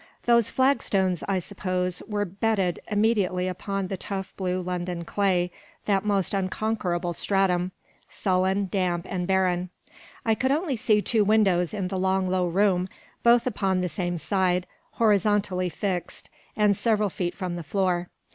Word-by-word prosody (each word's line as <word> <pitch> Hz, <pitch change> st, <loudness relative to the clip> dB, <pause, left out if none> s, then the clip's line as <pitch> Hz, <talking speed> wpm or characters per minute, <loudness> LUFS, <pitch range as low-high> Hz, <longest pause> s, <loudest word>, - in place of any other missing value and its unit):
Those 235 Hz, -2 st, +4 dB
flag 265 Hz, +2 st, +2 dB
stones, 190 Hz, -4 st, 0 dB
I 195 Hz, -1 st, +1 dB
suppose, 185 Hz, -1 st, -2 dB
were 205 Hz, -1 st, -1 dB
bedded 195 Hz, -2 st, 0 dB
immediately 205 Hz, -4 st, +1 dB
upon 195 Hz, +2 st, -3 dB
the 190 Hz, +1 st, -4 dB
tough 195 Hz, 0 st, -5 dB
blue 185 Hz, -1 st, -1 dB
London 180 Hz, -1 st, -3 dB
clay, 180 Hz, -2 st, +1 dB, 0.3 s
that 195 Hz, -2 st, +2 dB
most 200 Hz, -3 st, 0 dB
unconquerable 185 Hz, -3 st, -1 dB
stratum, 185 Hz, -1 st, +1 dB, 0.4 s
sullen, 190 Hz, +1 st, +1 dB
damp, 180 Hz, -3 st, 0 dB
and 180 Hz, -2 st, -3 dB
barren. 185 Hz, -2 st, +1 dB, 0.6 s
I 225 Hz, -, +4 dB
could 260 Hz, +4 st, 0 dB
only 300 Hz, -1 st, 0 dB
see 215 Hz, -3 st, +2 dB
two 220 Hz, -3 st, +2 dB
windows 195 Hz, -5 st, +3 dB
in 195 Hz, -4 st, -3 dB
the 190 Hz, -1 st, -2 dB
long 190 Hz, 0 st, +1 dB
low 185 Hz, -1 st, +1 dB
room, 185 Hz, 0 st, +2 dB, 0.3 s
both 235 Hz, 0 st, +5 dB
upon 195 Hz, -6 st, 0 dB
the 180 Hz, -, -1 dB
same 175 Hz, +2 st, -2 dB
side, 180 Hz, +1 st, +1 dB, 0.3 s
horizontally 205 Hz, -4 st, +2 dB
fixed, 180 Hz, 0 st, -4 dB, 0.2 s
and 210 Hz, -1 st, +3 dB
several 215 Hz, -2 st, +1 dB
feet 175 Hz, 0 st, -3 dB
from 180 Hz, -3 st, -4 dB
the 175 Hz, -, -4 dB
floor. 180 Hz, +1 st, -1 dB
190 Hz, 150 wpm, -26 LUFS, 180-205 Hz, 0.6 s, both